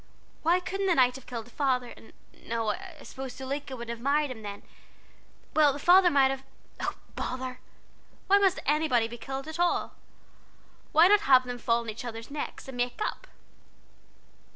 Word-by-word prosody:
Why 340 Hz, +3 st, +3 dB
couldn't 390 Hz, +2 st, -2 dB
the 360 Hz, -, +3 dB
knight 250 Hz, -2 st, +4 dB
have 265 Hz, -, -15 dB
killed 230 Hz, -3 st, -5 dB
the 240 Hz, -, -17 dB
father, 255 Hz, -3 st, 0 dB
and -, -, -16 dB, 0.4 s
no, 230 Hz, -1 st, -1 dB
I 375 Hz, -, -9 dB
suppose 265 Hz, -1 st, -7 dB
Zuleika 270 Hz, +1 st, -5 dB
wouldn't 235 Hz, -1 st, -5 dB
have 230 Hz, -, -16 dB
married 285 Hz, +2 st, +1 dB
him 230 Hz, -3 st, -8 dB
then. 205 Hz, -1 st, -7 dB, 0.9 s
Well, 300 Hz, -3 st, +5 dB
the -, -, -5 dB
father 355 Hz, +5 st, +6 dB
might 275 Hz, -3 st, +4 dB
have 270 Hz, 0 st, -4 dB, 0.4 s
oh, -, -, -2 dB, 0.2 s
bother! 255 Hz, 0 st, -4 dB, 0.7 s
why 400 Hz, +1 st, +5 dB
must 385 Hz, -2 st, +3 dB
anybody 285 Hz, -6 st, +2 dB
be 240 Hz, +1 st, -9 dB
killed, 270 Hz, +3 st, -5 dB
anyhow? 345 Hz, +2 st, 0 dB, 1.0 s
why 325 Hz, +2 st, +7 dB
not 415 Hz, +2 st, +6 dB
have 260 Hz, -10 st, +5 dB
them 245 Hz, -1 st, -5 dB
fall 235 Hz, 0 st, +1 dB
on 230 Hz, -, -7 dB
each 220 Hz, -, -8 dB
other's 230 Hz, +1 st, -7 dB
necks, 295 Hz, -1 st, -5 dB
and 265 Hz, -2 st, -8 dB
make 245 Hz, 0 st, -1 dB
up?" -, -, -3 dB
265 Hz, 175 wpm, -28 LUFS, 245-315 Hz, 1.0 s, why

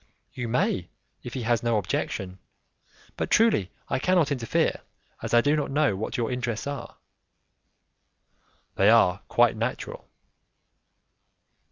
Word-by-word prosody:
"You 120 Hz, -1 st, -4 dB
may, 105 Hz, -6 st, 0 dB, 0.3 s
if 120 Hz, -, -8 dB
he 130 Hz, -, -3 dB
has 115 Hz, 0 st, +1 dB
no 115 Hz, -2 st, +1 dB
objection, 95 Hz, -1 st, -3 dB, 0.8 s
but -, -, -2 dB
truly 220 Hz, -, +3 dB, 0.2 s
I -, -, -1 dB
cannot 175 Hz, -1 st, +2 dB
interfere, 120 Hz, -5 st, 0 dB, 0.4 s
as -, -, -5 dB
I 120 Hz, -, +6 dB
do 145 Hz, +3 st, +2 dB
not 150 Hz, -, -1 dB
know 145 Hz, -6 st, +2 dB
what 110 Hz, +7 st, -4 dB
your 115 Hz, -1 st, -1 dB
intentions 120 Hz, -3 st, -3 dB
are." 140 Hz, 0 st, -6 dB, 1.8 s
"They 100 Hz, +2 st, +5 dB
are 100 Hz, -5 st, +5 dB
quite 120 Hz, -1 st, +3 dB
natural." 115 Hz, +3 st, -4 dB
120 Hz, 130 wpm, -26 LUFS, 110-135 Hz, 1.8 s, I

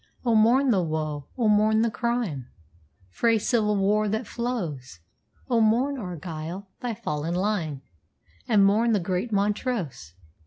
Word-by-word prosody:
Oh, 235 Hz, -, +3 dB
mourn 240 Hz, +5 st, +4 dB
the 195 Hz, -5 st, +3 dB
woe! 155 Hz, -3 st, -3 dB
oh, 235 Hz, -3 st, +2 dB
mourn 215 Hz, +1 st, +4 dB
the 230 Hz, -, +1 dB
crime 225 Hz, -, -2 dB, 0.6 s
Frae 230 Hz, -, +2 dB
civil 210 Hz, -1 st, +1 dB
war 210 Hz, +2 st, +2 dB
that 220 Hz, +3 st, -2 dB
flows! 175 Hz, -, -4 dB, 0.5 s
Oh, 235 Hz, -3 st, +2 dB
mourn, 250 Hz, +6 st, +2 dB
Argyll, 175 Hz, 0 st, -6 dB
thy 240 Hz, -3 st, -3 dB
fallen 165 Hz, -6 st, -3 dB
line, 175 Hz, -8 st, -1 dB, 0.6 s
And 205 Hz, -4 st, +5 dB
mourn 225 Hz, +4 st, +3 dB
the 210 Hz, -, +3 dB
great 185 Hz, +5 st, -2 dB
Montrose! 200 Hz, -, -2 dB
210 Hz, 140 wpm, -25 LUFS, 170-230 Hz, 0.6 s, And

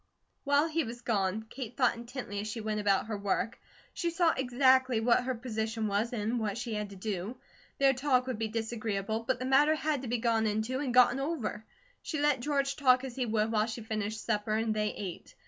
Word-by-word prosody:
While 285 Hz, +2 st, +3 dB
he 325 Hz, 0 st, 0 dB
was 240 Hz, 0 st, -7 dB
gone, 205 Hz, -1 st, 0 dB
Kate 245 Hz, -1 st, -7 dB
thought 255 Hz, -3 st, +3 dB
intently 235 Hz, -3 st, -6 dB
as 210 Hz, -, -4 dB
she 215 Hz, +2 st, -4 dB
went 215 Hz, -1 st, -2 dB
about 200 Hz, -2 st, +2 dB
her 215 Hz, -1 st, -3 dB
work. 200 Hz, +3 st, -1 dB, 0.3 s
She 345 Hz, -, -1 dB
saw 335 Hz, -1 st, +3 dB
exactly 260 Hz, -1 st, +3 dB
what 240 Hz, +2 st, +3 dB
her 260 Hz, -1 st, -1 dB
position 225 Hz, -2 st, -3 dB
was, 210 Hz, +3 st, 0 dB
and 230 Hz, +1 st, -1 dB
what 215 Hz, -1 st, -2 dB
she 235 Hz, -1 st, -4 dB
had 210 Hz, -1 st, -3 dB
to 200 Hz, -, -10 dB
do. 200 Hz, +3 st, -4 dB, 0.4 s
Their 275 Hz, -1 st, +5 dB
talk 255 Hz, -1 st, +2 dB
would 255 Hz, -4 st, -4 dB
be 225 Hz, -, 0 dB
disagreeable, 220 Hz, -1 st, -2 dB
but 245 Hz, +3 st, -1 dB
the 255 Hz, -, -4 dB
matter 285 Hz, +4 st, +4 dB
had 305 Hz, -3 st, -1 dB
to 245 Hz, -2 st, -1 dB
gone 225 Hz, -1 st, +1 dB
into 220 Hz, +5 st, -1 dB
and 275 Hz, -3 st, -1 dB
gotten 250 Hz, +1 st, +5 dB
over. 275 Hz, -7 st, -3 dB, 0.4 s
She 310 Hz, -, -3 dB
let 290 Hz, -2 st, +3 dB
George 275 Hz, +1 st, 0 dB
talk 255 Hz, -2 st, +4 dB
as 260 Hz, -3 st, -6 dB
he 255 Hz, -2 st, -1 dB
would 220 Hz, 0 st, +1 dB
while 215 Hz, -1 st, +2 dB
she 230 Hz, 0 st, -5 dB
finished 220 Hz, 0 st, -3 dB
supper 215 Hz, -1 st, 0 dB
and 220 Hz, 0 st, +1 dB
they 210 Hz, 0 st, 0 dB
ate. 185 Hz, -4 st, -7 dB
235 Hz, 215 wpm, -30 LUFS, 215-260 Hz, 0.4 s, Their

